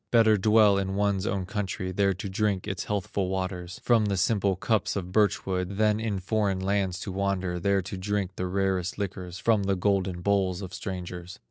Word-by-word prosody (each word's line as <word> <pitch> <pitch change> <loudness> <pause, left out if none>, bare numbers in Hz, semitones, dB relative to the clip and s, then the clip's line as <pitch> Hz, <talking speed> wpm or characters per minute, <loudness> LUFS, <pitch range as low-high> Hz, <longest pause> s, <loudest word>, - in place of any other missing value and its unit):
Better 115 -2 +5
dwell 105 0 +5
in 95 0 -2
one's 100 0 +1
own 100 -5 -1
country, 95 -1 -3
There 100 0 +2
to 100 +3 -5
drink 100 0 -1
its 95 -3 -3
healthful 100 -2 -2
waters 95 -2 -4
From 115 -3 +4
the 100 -2 0
simple 100 0 +2
cups 110 +4 0
of 90 -2 -4
birch 105 -1 +2
wood, 95 0 -2
Than 105 0 +3
in 110 -3 -1
foreign 100 0 0
lands 95 -1 0
to 95 - -4
wander, 95 -2 -1
There 100 +1 +1
to 95 +2 -6
drink 100 0 -1
the 90 - -2
rarest 95 -1 -1
liquors 95 -3 -4
From 100 +1 +2
the 100 0 +1
golden 95 -2 0
bowls 95 -1 +1
of 90 -1 -7
strangers." 90 -1 -6
95 Hz, 195 wpm, -27 LUFS, 95-100 Hz, -, Better